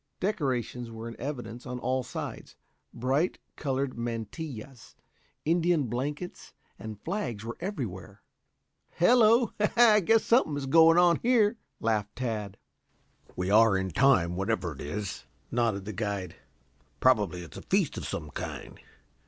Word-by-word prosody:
Decorations 130 - -2
were 115 0 -7
in 115 - -7
evidence 120 -4 -6
on 125 0 -4
all 130 +1 0
sides; - - -7 0.4
bright 135 +8 0 0.2
colored 135 -3 -2
mantillas, 120 +2 -6 0.5
Indian 170 -1 +2
blankets 145 +8 -5 0.3
and 110 -2 -7
flags 125 - -3
were 115 - -5
everywhere. 105 - -6 0.7
"Hello, 230 +4 +5 0.3
I 225 -3 +7
guess 220 +4 +3
something 230 - +3
is 140 - -3
going 165 +4 +6
on 175 -1 +5
here," 230 -2 +3 0.2
laughed 105 -2 -1
Tad. 110 -6 -3 0.8
"We 90 +2 -2
are 110 -1 +6
in 95 -1 -2
time, 90 - +3
whatever 90 -2 -1
it 70 - -11
is," 100 +6 -5 0.2
nodded 115 -5 0
the 105 - -5
guide. 100 -4 -3 0.6
"Probably 105 -8 +2
it's 85 - -11
a - - -7
feast - - +1
of - - -5
some 75 -2 -5
kind. - - -7
125 Hz, 135 wpm, -28 LUFS, 105-165 Hz, 0.8 s, I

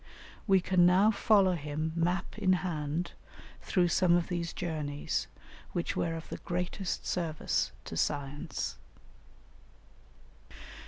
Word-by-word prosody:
We 195 -2 +5
can 180 0 +3
now 190 +4 +5
follow 200 -3 +4
him 155 0 -3
map 175 +2 0
in 185 - +4
hand 160 0 -2 0.5
through 180 -3 +2
some 175 -1 +4
of 175 -1 +1
these 170 -2 -2
journeys, 150 -4 -2 0.5
which 175 - -1
were 165 -1 0
of 165 - -7
the - - -5
greatest 180 +2 -3
service 165 -4 -1
to - - -6
science. 145 - -2
175 Hz, 115 wpm, -31 LUFS, 155-180 Hz, 0.5 s, We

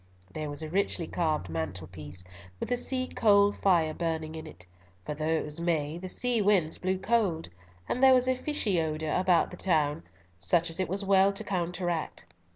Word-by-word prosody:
There 155 -1 -4
was 145 +2 -2
a 155 - -5
richly 185 -2 0
carved 155 - -1
mantel 80 +1 -4
piece, 80 0 -8 0.4
with - - -4
a - - +4
sea 255 +1 0
coal 205 -4 +4
fire 170 -6 +2
burning 160 -1 -3
in 160 0 -7
it, 90 - -11 0.4
for - - -3
though 155 +1 -3
it 160 0 0
was 150 +2 -4
May, 160 -2 -1
the 185 +1 -6
sea 245 +2 +1
winds 190 -6 +2
blew 185 +1 -1
cold, 190 -6 0 0.4
and 250 - -2
there 265 -1 +7
was 255 0 +2
a 260 - +2
fishy 245 - +1
odour 155 -1 -2
about 180 -2 +2
the 180 - -9
town, 155 -6 +1 0.4
such 165 - +2
as 165 - 0
it 185 - -1
was 195 +2 -1
well 195 0 +5
to 200 - -4
counteract. 175 - -3
170 Hz, 195 wpm, -28 LUFS, 155-200 Hz, 0.4 s, there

